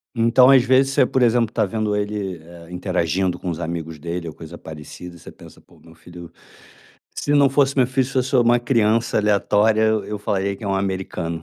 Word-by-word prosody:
Então 120 +3 +4
às 135 -2 +6
vezes 130 +2 +3
você, 130 - +3
por 130 - -1
exemplo, 120 -1 +2
tá 110 - +1
vendo 105 +1 -2
ele, 105 -3 -3
eh, 85 0 -14
interagindo 90 0 -2
com 90 - -5
os 85 0 -5
amigos 80 -1 -5
dele 85 +2 -5
ou 80 - -9
coisa 80 +1 -11
parecida, 80 +3 -11
você - - -12
pensa, - - -16
"pô, - - -24
meu 80 - -18
filho, 85 0 -13 0.8
se 145 - -2
não 140 -1 +5
fosse 140 0 +1
meu 130 -2 +3
filho, 130 0 0
se 135 - -8
eu - - +2
sou 130 -1 +1
uma 120 +1 +4
criança 115 -2 +1
aleatória, 105 +1 +2
eu 110 -1 +1
eu 105 - -5
falaria 100 -1 -2
que 110 - -11
é - - -3
um 95 - 0
americano." 95 -4 -4
105 Hz, 215 wpm, -20 LUFS, 85-120 Hz, 0.8 s, às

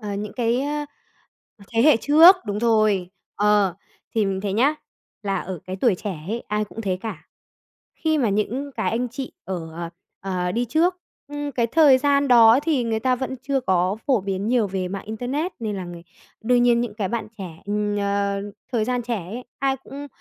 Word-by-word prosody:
ờ, 205 -2 -4
những 205 +1 -5
cái, 240 +1 0
á, 295 +1 -2 0.7
à, 200 - -15
thế 225 +1 +3
hệ 295 -4 +6
trước, 320 - +7
đúng 205 0 -2
rồi. 215 -6 +2 0.3
Ờ, 205 -3 +3 0.4
thì 220 -3 +2
mình 190 -1 -2
thấy 200 -1 -2
nhá, 270 +8 +3 0.5
là 195 -1 -1
ở 185 -2 -6
cái 185 0 -5
tuổi 210 0 +3
trẻ 185 -3 -5
ấy 230 +2 -3
ai 210 0 0
cũng 210 +2 -9
thế 185 -4 -1
cả. 190 -8 -7 0.7
Khi 315 -1 0
mà 240 -6 +2
những 235 +8 -1
cái 220 - -1
anh 240 +2 -1
chị 255 +2 -6
ở, 170 -4 -5
ờ, 170 +1 -5 0.3
ờ, 180 -2 -2
đi 240 +2 0
trước, 330 +9 +1 0.3
ừm, 290 -1 -4
cái 235 -2 +1
thời 280 0 +5
gian 280 0 +2
đó 235 0 +7
thì 295 -6 +1
người 225 -1 -1
ta 255 +1 +2
vẫn 260 +1 -4
chưa 275 -1 0
có 185 -2 +1
phổ 255 -7 +3
biến 195 +2 -3
nhiều 240 -4 +2
về 185 -1 -3
mạng 195 +1 -5
internet, 260 - -3
nên 215 -3 -3
là 185 - -4
người 175 -1 -9 0.4
đương 245 +2 +3
nhiên 240 -1 +4
những 230 -4 -3
cái 200 -4 -2
bạn 225 -2 -3
trẻ, 175 -4 -8
ừm, 205 0 -1
ờ, 200 0 0 0.3
thời 220 -3 +1
gian 245 0 -1
trẻ 235 -1 -2
ấy, 235 +7 -7
ai 270 -1 +1
cũng, 275 +2 -9
225 Hz, 210 wpm, -23 LUFS, 200-255 Hz, 0.7 s, trước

